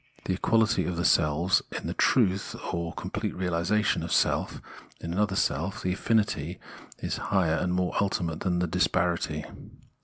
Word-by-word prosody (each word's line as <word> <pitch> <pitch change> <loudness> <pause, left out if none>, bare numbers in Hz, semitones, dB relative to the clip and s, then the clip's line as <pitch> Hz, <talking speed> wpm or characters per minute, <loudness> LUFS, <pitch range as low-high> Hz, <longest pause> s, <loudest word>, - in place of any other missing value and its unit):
The 95 - 0
equality 110 +3 +2
of 90 -2 -3
the 85 - -1
selves 85 +4 +3
is - - -4
the - - -4
truth, 100 -6 +2 0.2
or 85 -1 -2
completer - - -4
realisation, 90 +4 +1
of - - -5
self - - +1 0.4
in 85 0 -5
another 100 +1 +1
self; 95 +8 -1
the 90 - +1
affinity 95 -6 0 0.4
is - - -3
higher 90 -5 +2
and 90 - -1
more 90 0 0
ultimate 85 -5 -1
than 90 -2 0
the 90 - +1
disparity. 80 - 0
90 Hz, 155 wpm, -27 LUFS, 85-100 Hz, 0.4 s, selves